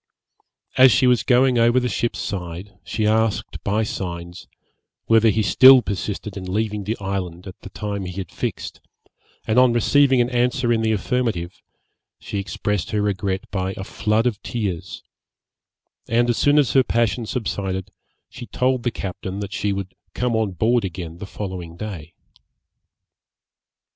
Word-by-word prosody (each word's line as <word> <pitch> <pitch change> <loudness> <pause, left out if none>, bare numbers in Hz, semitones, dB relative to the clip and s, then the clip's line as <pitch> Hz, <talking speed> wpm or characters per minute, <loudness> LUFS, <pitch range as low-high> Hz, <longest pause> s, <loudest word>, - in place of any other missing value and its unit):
As 130 0 +8
she 130 - +3
was 125 -3 +4
going 125 +1 +3
over 120 +2 +4
the 125 - -1
ship's 120 -1 -2
side, 90 0 -5
she 110 +4 -2
asked, 110 0 0
by 105 +3 +1
signs, 85 -3 -6 0.6
whether 115 0 +5
he 110 +1 +1
still 130 +6 +8
persisted 100 0 -4
in 95 -2 -6
leaving 105 0 -2
the 110 +3 -2
island 95 -2 -4
at 95 - -11
the - - -9
time 100 -1 -4
he 90 - -6
had 95 -3 -5
fixed, - - -5 0.6
and 110 +3 +3
on 125 -2 +5
receiving 135 +3 +4
an 120 +1 +1
answer 125 0 +1
in 115 - +1
the 110 0 +1
affirmative, 110 -5 -2 0.6
she 100 - -5
expressed 100 0 -2
her 105 - 0
regret 95 -1 -1
by 95 -1 -2
a 95 - -5
flood 105 +3 0
of 115 -4 -1
tears; 100 -8 -4 1.0
and 120 +1 +2
as 120 - -2
soon 145 +1 +4
as 140 -5 +3
her 135 - +6
passion 115 -1 0
subsided, 100 -6 -3 0.4
she 120 - -10
told 130 0 0
the 120 - 0
captain 95 -2 -6
that 100 -1 -5
she 105 - -1
would 95 -1 -4 0.2
come 125 -2 0
on 110 -3 0
board 115 +5 +2
again 85 -2 -6
the 100 - -7
following 90 -5 -6
day. 90 -6 -7
105 Hz, 160 wpm, -22 LUFS, 95-120 Hz, 1.0 s, As